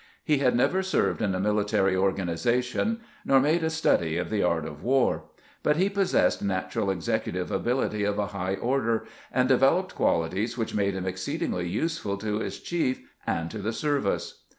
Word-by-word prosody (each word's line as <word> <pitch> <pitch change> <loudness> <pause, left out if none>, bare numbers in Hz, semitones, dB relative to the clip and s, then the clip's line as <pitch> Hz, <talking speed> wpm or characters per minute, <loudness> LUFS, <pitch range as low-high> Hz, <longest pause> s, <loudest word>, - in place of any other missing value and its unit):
He 150 -3 +2
had 125 -3 +3
never 180 +10 +2
served 190 -9 0
in 100 -4 +1
a - - -1
mili 105 +1 +1
tary 95 -2 +2
organization, 115 - 0 0.2
nor 135 - +5
made 155 +5 +2
a 160 - +2
study 85 - +1
of 90 +1 -3
the 105 -2 +1
art 85 -3 +1
of 75 -1 -8
war; 130 0 +2 0.4
but 150 - +2
he 190 +5 +2
possessed 195 -1 +2
natural 95 0 -1
executive 90 -5 -2
ability 120 -4 0
of 100 0 0
a 105 - +1
high 95 0 -1
order, 115 +1 0 0.3
and 125 0 +2
developed 135 +8 +3
qualities 95 +9 0
which 115 - -2
made 100 -2 +1
him 95 -1 -3
exceed 95 0 -3
ingly 90 -1 -1
useful 160 - -2
to 105 +1 -2
his - - -4
chief 160 -7 -1 0.3
and 80 0 -1
to 110 - -6
the 110 +3 -2
service. 145 -7 -1
105 Hz, 180 wpm, -27 LUFS, 95-135 Hz, 0.4 s, nor